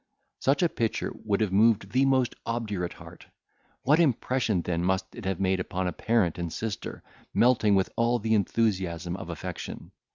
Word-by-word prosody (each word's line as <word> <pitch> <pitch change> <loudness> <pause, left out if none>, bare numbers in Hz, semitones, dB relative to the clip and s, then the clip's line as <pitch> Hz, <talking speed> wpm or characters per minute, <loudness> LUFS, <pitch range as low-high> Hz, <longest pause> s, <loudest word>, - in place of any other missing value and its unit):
Such 140 +6 +2
a - - +5
picture 115 -6 -2
would 105 0 +1
have 105 -4 +1
moved 110 +2 +3
the 130 +2 +3
most 130 -3 +2
obdurate 105 -7 -3
heart; - - -13 0.6
what 150 +5 +4
impression 125 - +1
then 85 0 -1
must 95 +1 0
it - - -9
have 95 -2 -1
made 95 -1 +1
upon 90 0 -2
a 90 - -1
parent 105 -8 +1
and 85 -1 -3
sister, 110 +2 -5 0.3
melting 115 -4 +4
with 95 -1 +1
all 120 +1 +2
the 110 0 0
enthusiasm 95 -5 0
of 95 - -7
affection! - - -6
105 Hz, 170 wpm, -27 LUFS, 95-115 Hz, 0.6 s, a